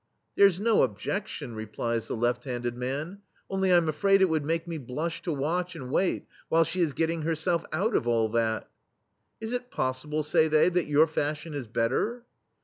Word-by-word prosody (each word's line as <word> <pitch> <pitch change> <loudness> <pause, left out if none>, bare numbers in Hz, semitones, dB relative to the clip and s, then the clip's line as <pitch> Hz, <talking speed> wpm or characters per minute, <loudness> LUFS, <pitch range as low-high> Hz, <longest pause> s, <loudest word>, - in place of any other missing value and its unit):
"There 200 - +8
*s 180 -3 -1
no 220 +2 +2
obje6tion/* 130 - -1
replies 110 +1 -3
the - - -3
left 120 +2 0
handed 120 -2 -3
man, 140 +10 -4 0.3
"only 190 -1 +1
I'm 175 -2 +5
afraid 195 +6 +3
it 190 - +4
would 160 -2 +1
make 165 +3 -1
me 165 -2 -4
blush 150 +6 -4
to 175 - -3
watch 170 +5 -1
and 130 -5 -7
wait 185 +5 +1 0.2
while 165 +1 +5
she 180 +3 -2
is 160 -4 +1
getting 165 +1 0
herself 165 +2 0
out 195 +9 0
of 120 - +1
all 115 -2 +3
that." 110 0 0 0.7
"Is 225 +2 -5
it 245 0 -3
possible," 150 - -2
say 155 +1 +3
they, 155 +2 +4
"that 180 -2 0
your 150 +1 +5
fashion 155 0 -3
is 140 -5 -5
better?" 135 - -1
155 Hz, 190 wpm, -28 LUFS, 130-180 Hz, 0.7 s, There